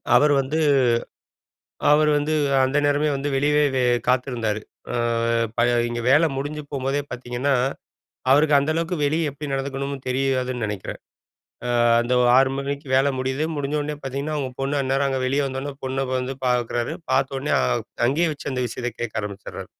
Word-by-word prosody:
அவர் 145 +3 +5
வந்து 140 +4 -1 1.3
அவர் 150 +1 +5
வந்து 150 +2 0 0.3
அந்த 135 +3 0
நேரமே 145 +1 +2
வந்து 140 +2 -3
வெளியவே 145 -2 +2 0.2
காத்திருந்தாரு. 120 -4 0 0.3
ஆ, - - 0 0.6
ப - - +1 0.3
இங்க 120 0 -3
வேலை 155 +4 +5
முடிஞ்சு 150 +2 -4
போம்போதே 135 +1 -1
பாத்தீங்கன்னா, 125 +3 -1 0.8
அவருக்கு 145 +1 +5
அந்த 145 +3 0
அளவுக்கு 170 +2 -1
வெளிய 155 +1 +1
எப்டி 145 0 -6
நடந்துக்கணும்னு 135 0 -3
தெரியாதுன்னு 130 -2 0
நெனைக்குறேன். 105 -3 -6 0.7
அ, - - 0 0.3
அந்த 120 +1 0 0.2
6:00 135 0 +5
மணிக்கு 140 +1 -4
வேல 135 +1 +4
முடியுது. 130 +4 -1
முடிஞ்ச 145 +1 -2
உடனே 150 0 -3
பாத்தீங்கன்னா 140 +3 -3
அவங்க 135 -3 -2
பொண்ணா 140 +1 0
அந்நேரம் 135 +1 +1
அங்க 135 -1 -1
வெளிய 140 +2 +1
வந்த 130 0 -4
உடனே, 145 -1 -5
பொண்ண 135 0 -1
வந்து 130 +1 -3
பாக்குறாரு, 120 +3 0 0.2
பாத்த 135 0 +1
உடனே 145 +3 -1 0.5
அங்கயே 165 +5 +2
வெச்சு 140 - -6
அந்த 125 -1 -1
விஷயத்த 120 +2 -4
கேக்க 110 -2 -2
ஆரம்பிச்சிடுறாரு. 100 -1 -7
135 Hz, 155 wpm, -23 LUFS, 130-145 Hz, 1.3 s, அவர்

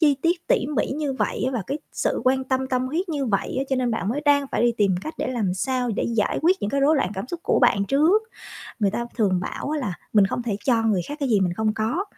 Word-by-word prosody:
chi 290 -4 +4
tiết, 340 0 0
tỉ 255 - +2
mỉ - - +2
như 295 -3 -1
vậy 260 - -2
á, - - 0
và 235 -6 -2
cái 285 - -3
sự - - -1
quan 265 +1 +2
tâm, 260 0 0
tâm 255 0 0
huyết 340 +7 -2
như 285 -4 -1
vậy 200 -3 -1
á, 270 - 0
cho 265 - +1
nên 250 -2 0
bạn 200 -3 -2
mới 270 +6 -1
đang 285 -1 +4
phải - - +1
đi 240 -1 +4
tìm 200 -3 +3
cách 315 - -6
để - - -1
làm 215 -8 -1
sao 250 +3 -1
để - - 0
giải 225 -3 0
quyết 360 +4 +4
những 205 - -2
cái 275 - 0
rối 300 +3 +4
loạn 270 - 0
cảm 195 +5 -4
xúc 345 +2 -5
của - - +2
bạn 200 -6 +3
trước. 315 - +3 0.6
Người 205 -4 +2
ta 235 +3 -3
thường 190 -6 +2
bảo 280 - -4
á 305 - -1
là 205 -11 -3 0.2
mình 205 -3 +5
không 240 - -3
thể 225 -4 -2
cho 235 -4 +3
người 210 -5 +1
khác 290 - -5
cái 280 - 0
gì 210 -5 +3
mình 180 -2 +1
không 215 +1 0
có. 230 - -1
255 Hz, 285 wpm, -23 LUFS, 215-285 Hz, 0.6 s, mình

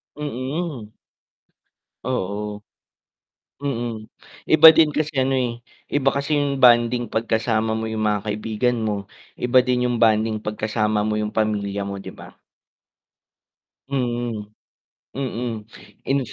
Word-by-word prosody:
Mm. 140 -3 -4 1.2
Oo. 105 -3 -3 1.0
Mm, 120 -6 -4 0.4
iba 155 +1 +8
din 160 0 +5
kasi 155 0 0
ano 135 +1 +2
eh 120 -2 -1 0.3
iba 135 -2 +2
kasi 140 +2 -2
'yong 140 -2 -1
bonding 120 -1 +4
kapag 115 +1 -1
kasama 110 -1 0
mo 110 - -3
'yong 110 - -3
mga 105 -1 0
kaibigan 110 +3 -1
mo, 105 -3 -2 0.3
iba 125 +1 +3
din 125 0 +1
'yong 120 -1 -1
bonding 110 -1 +3
kapag 105 0 -6
kasama 105 -1 0
mo 105 0 -1
'yong 105 0 -3
pamilya 100 -2 -1
mo 100 0 -5
di - - -11
ba? - - -14 1.5
Mm. 120 -5 -3 0.6
Mm 120 -4 -3 0.4
in 140 +1 +2
115 Hz, 125 wpm, -22 LUFS, 105-130 Hz, 1.5 s, iba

